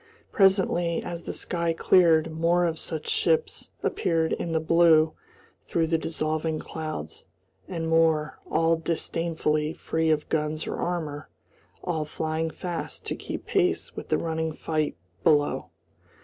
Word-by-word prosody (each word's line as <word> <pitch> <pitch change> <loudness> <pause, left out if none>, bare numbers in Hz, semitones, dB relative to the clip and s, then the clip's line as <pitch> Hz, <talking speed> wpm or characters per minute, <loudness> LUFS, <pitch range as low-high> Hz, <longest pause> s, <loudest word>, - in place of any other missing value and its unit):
Presently, 190 -4 +3
as 170 -1 -5
the - - -5
sky 170 -1 -1
cleared, 165 -2 +4
more 170 +2 +2
of 165 -2 -1
such 160 -2 -5
ships 475 0 0
appeared 165 -2 +1
in 170 - -3
the 160 - +2
blue 160 -1 +5 0.5
through 165 -1 +1
the 165 0 +1
dissolving 155 0 -1
clouds, 155 - -6 0.4
and 165 -3 -3
more, 160 -2 +2
all 165 +1 +3
disdainfully 160 -2 -1
free 160 0 -1
of 150 -1 +1
guns 155 0 -1
or - - -4
armour, 155 -4 -3 0.5
all 160 -4 -1
flying 160 +1 -2
fast 175 +1 -5
to - - -2
keep - - -6
pace 370 -2 0
with - - -7
the - - +3
running 160 -1 -2
fight 155 - -2 0.3
below. 145 -7 +3
160 Hz, 135 wpm, -26 LUFS, 155-170 Hz, 0.5 s, blue